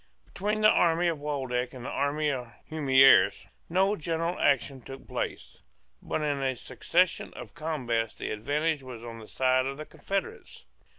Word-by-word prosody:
Between 210 +2 -2
the 215 - +7
army 170 +1 +3
of 160 -3 -3
Waldeck 130 -4 -2
and 125 -1 -8
the - - -3
army 145 +2 0
of 125 -3 -5 0.2
Humieres 135 -3 +5 0.2
no 190 +4 +2
general 165 0 -2
action 135 -1 +1
took 135 +2 -11
place: - - -5 0.4
but 155 - -2
in 145 -2 -1
a 130 -1 0
succession 175 +8 0
of - - -9
combats 130 -9 -2
the - - -5
advantage 145 +8 -1
was 125 -3 -9
on 115 -1 -8
the 110 - -11
side 130 0 +2
of 135 0 -4
the 155 - -7
confederates. 195 - -5
145 Hz, 165 wpm, -28 LUFS, 130-165 Hz, 0.4 s, the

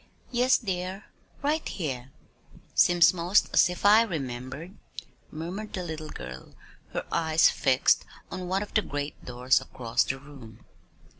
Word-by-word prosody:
"Yes, 250 +1 +4
dear 190 -1 -4 0.4
right 305 +3 0
here." 135 -8 -4 0.6
"Seems 175 0 +5
'most 180 +3 +2
as - - +6
if 180 +2 -6
I 210 +2 +8
remembered," 140 - -5 0.5
murmured 180 +7 -6
the 185 - -3
little 155 -2 -6
girl, 65 0 -9 0.4
her - - -3
eyes 160 0 +4
fixed 135 -2 +3 0.3
on 185 -1 -5
one 190 +2 0
of 210 - -11
the 215 - +4
great 145 -5 -5
doors 125 +1 +2
across 115 -2 -1
the 135 - -3
room. 135 -6 -14
165 Hz, 140 wpm, -27 LUFS, 135-190 Hz, 0.6 s, I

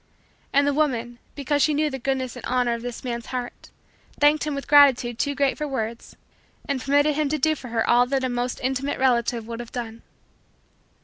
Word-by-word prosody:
And 280 +1 +3
the 285 - +1
woman, 240 -5 -1 0.2
because 285 +1 0
she 305 0 +3
knew 300 0 +1
the 265 - -5
goodness 260 -1 -2
and - - -9
honor 250 -1 +1
of 235 - -4
this 245 -1 -6
man's 235 -2 -4
heart, 250 -1 -6 0.5
thanked 295 +1 +4
him 295 - -2
with 280 - -6
gratitude 260 -5 +5
too 285 -1 0
great 280 -1 0
for 300 - -2
words 230 -4 -5 0.5
and 275 -2 -1
permitted 290 +2 +2
him 300 0 0
to 305 - 0
do 310 +2 +2
for 270 -4 -9
her 230 -1 -1
all 245 +1 +4
that 265 0 -1
a 255 - 0
most 245 0 -2
intimate 265 +2 -1
relative 235 -3 +1
would 230 0 -7
have 240 -1 -8
done. 230 -2 -6
260 Hz, 205 wpm, -24 LUFS, 240-285 Hz, 0.5 s, gratitude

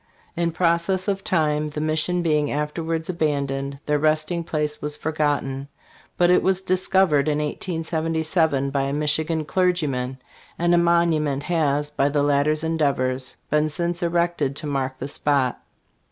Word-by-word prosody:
In 170 -1 0
process 170 +3 +1
of 195 -1 -1
time, 150 -3 +1
the 150 - -5
mission 155 +3 0
being 150 -3 +1
afterwards 160 +2 -2
abandoned, 140 -5 -1
their 150 0 +1
resting 155 +3 +1
place 150 -2 -2
was 150 0 -3
forgotten; 145 -3 -1 0.5
but 175 0 +4
it 180 - +5
was 190 -1 +2
discovered 185 -5 +2
in 150 -1 +1
1877 160 -2 -1
by 140 0 0
a 140 - -2
Michi 150 +1 +1
gan 160 -2 -1
clergyman, 150 -8 0 0.4
and 175 +1 +2
a - - +5
monument 165 -5 +2
has, 150 -4 0
by 140 -1 +1
the 145 0 +1
latter's 145 +2 +2
endeavors, 135 -5 0 0.2
been 150 +1 +2
since 170 +3 -2
erected 170 -5 0
to 155 - -5
mark 135 -2 -2
the 130 - -5
spot. 140 -3 0
155 Hz, 150 wpm, -23 LUFS, 145-170 Hz, 0.5 s, it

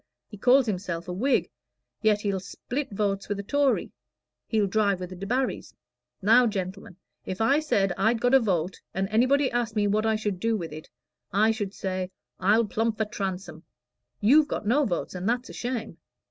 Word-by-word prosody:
He - - -11
calls 250 +5 +4
himself 180 -5 -3
a 180 - -3
Whig, 215 - +1 0.5
yet 215 -1 +3
he'll 200 -2 -1
split 250 +8 -5
votes 200 -1 -2
with 205 - -1
a - - -4
Tory 285 +5 +1 0.6
he'll 215 -3 +2
drive 200 -1 +1
with 180 0 -6
the - - -6
Debarrys. 245 +8 -2 0.5
Now, 235 +4 +6
gentlemen, 190 -3 -5 0.3
if 185 - -5
I 270 +7 +4
said 200 -11 +1
I'd 225 +4 +2
got 245 +2 +2
a 270 - +8
vote, 185 -6 -1
and 190 +1 0
anybody 255 +5 +3
asked 235 -2 -1
me 210 -1 +2
what 215 +2 +1
I 220 - +2
should 210 -4 -2
do 225 +2 +1
with 165 -5 -6
it, 155 0 -10 0.4
I 215 +3 +4
should 205 -3 -4
say, 185 -1 -3 0.3
'I'll 210 +5 +4
plump 220 +1 -1
for 220 - +1
Transome.' 195 -2 -5 0.6
You've 290 +8 +5
got - - -4
no 275 +7 +3
votes, 175 -7 -2
and 185 +3 -2
that's 245 +1 -1
a - - -11
shame. 240 -2 -4
210 Hz, 190 wpm, -26 LUFS, 190-235 Hz, 0.6 s, a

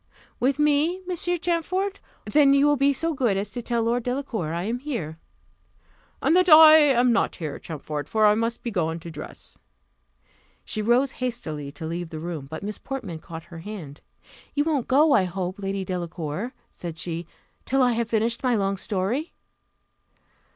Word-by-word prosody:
"With 265 +3 +2
me, 300 +4 +2
Monsieur 355 0 -1
Champfort? 360 +4 -1 0.3
then 285 -2 +5
you 280 +1 +4
will 295 0 +4
be 280 +1 +3
so 330 +4 -1
good 240 -8 +1
as 200 +1 -3
to 245 - -4
tell 235 0 -1
Lord 235 +2 +1
Delacour 245 - -3
I 170 +1 -2
am 230 +5 -2
here." 225 - -5 1.0
"And 325 - +4
that 365 0 +4
I 315 0 +10
am 250 -5 +4
not 230 - +1
here, 155 -4 -5
Champfort; 150 -2 -6
for 220 -1 +3
I 210 - +6
must 230 +2 -2
be 235 - -3
gone 165 -4 -1
to 170 - -8
dress." 150 -1 -10 1.1
She 215 - -3
rose 240 +5 +3
hastily 155 - -4
to 155 +2 -7
leave 170 +1 -4
the 160 - -6
room, 160 -4 -5
but 160 +6 -7
Miss 210 +1 -5
Portman 220 -12 -6
caught 165 0 -9
her 165 -1 -11
hand: 165 -7 -8 0.5
"You 290 - +3
won't 295 -6 0
go, 295 +4 +4
I 190 - +4
hope, 185 +1 -4
Lady 195 -1 -3
Delacour," 175 - -4 0.2
said 170 -2 -7
she, 170 0 -4 0.4
"till 270 0 +2
I 250 - +4
have 230 -1 -1
finished 230 +1 0
my 250 -2 +2
long 195 -1 0
story?" 210 - -2
225 Hz, 180 wpm, -25 LUFS, 175-275 Hz, 1.1 s, I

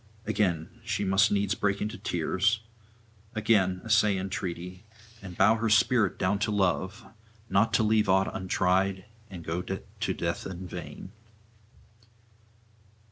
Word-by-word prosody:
Again, 100 0 -1
she 110 -2 -2
must 95 +1 +3
needs 100 -1 +1
break 100 -1 0
into 105 +1 -3
tears, 95 +3 0 0.7
again 100 -4 +2
essay 110 -3 +3
entreaty, 90 -1 -5 0.4
and 95 -3 -9
bow 110 - +5
her 115 0 0
spirit 110 -1 +3
down 100 +2 0
to 105 - 0
love, 100 +1 0 0.5
not 105 +4 +3
to - - +3
leave 110 -1 +2
aught 95 +1 +2
untried 95 +1 0 0.2
and 90 -4 -9
go 85 +2 -2
to 95 +1 -4
death - - -3
in 95 -1 -7
vain. 95 - -8
95 Hz, 130 wpm, -28 LUFS, 95-105 Hz, 0.7 s, bow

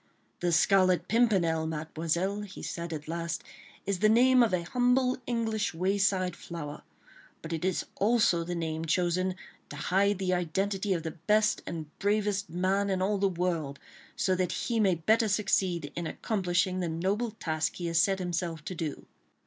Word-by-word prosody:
"The 175 -1 0
Scarlet 185 +2 +4
Pimpernel, 185 -9 +2
Mademoiselle," 165 +5 -2
he 200 -2 -9
said 170 -1 -4
at 155 -1 -6
last, 170 +1 -3 0.4
"is 200 -2 -1
the 215 - +4
name 250 +3 +5
of 230 - +3
a 180 -2 0
humble 250 +5 +2
English 225 -5 -1
wayside 185 0 +1
flower; 150 -4 -7 0.6
but 165 +1 -5
it 160 - -3
is 185 -1 0
also 205 -5 +3
the 175 +1 -4
name 160 -1 -3
chosen 180 +2 +1 0.3
to - - -8
hide 195 +6 +1
the 185 -1 0
identity 190 +3 0
of 165 - -4
the 160 - -3
best 210 +7 +1
and 165 -2 -4
bravest 205 -1 0
man 190 +4 0
in 190 -1 0
all 200 +2 +1
the 195 0 +3
world, 170 -6 -2 0.4
so 185 - +1
that 180 -1 0
he 235 -2 -1
may 195 -4 +3
better 220 +8 +2
succeed 190 -6 0
in 170 -1 -3
accomplishing 185 -2 0
the 175 -2 -1
noble 195 +8 -1
task 160 -7 -2
he 175 - -5
has 165 -1 +3
set 195 -1 +2
himself 170 -3 -3
to - - -4
do." 160 -4 -5
185 Hz, 170 wpm, -29 LUFS, 170-205 Hz, 0.6 s, name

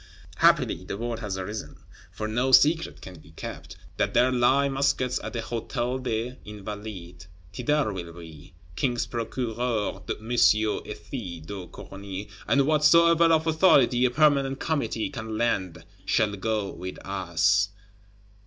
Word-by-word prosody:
Happily 90 - +3
the 95 - -5
word 115 0 -3
has 100 -4 -4
arisen, 95 -4 -6 0.3
for 110 - -4
no 120 +4 0
secret 160 +5 +4
can 90 -3 -10
be 75 +1 -18
kept, - - -8 0.2
that - - 0
there 125 +2 +4
lie 130 +3 +3
muskets 135 -2 0
at - - -6
the 115 - -2
Hôtel 120 +2 -3
des 120 +1 -3
Invalides. 105 -4 -8 0.3
Thither 125 0 0
will 85 -3 -6
we: 80 -1 -13 0.2
King's 120 - 0
Procureur 115 -1 -2
M. 110 +2 -5
Ethys 110 - 0
de 95 0 -7
Corny, 100 +2 -8 0.2
and 140 -1 +3
whatsoever 165 +3 +5
of 160 -1 +3
authority 150 -7 +4
a - - +4
Permanent 140 -1 +2
Committee 140 -5 -1
can 110 -4 -5
lend, 95 -8 -1 0.2
shall 105 +1 +2
go 105 0 -2
with 90 +2 -7
us. 95 +1 +1
115 Hz, 135 wpm, -26 LUFS, 95-130 Hz, 0.3 s, whatsoever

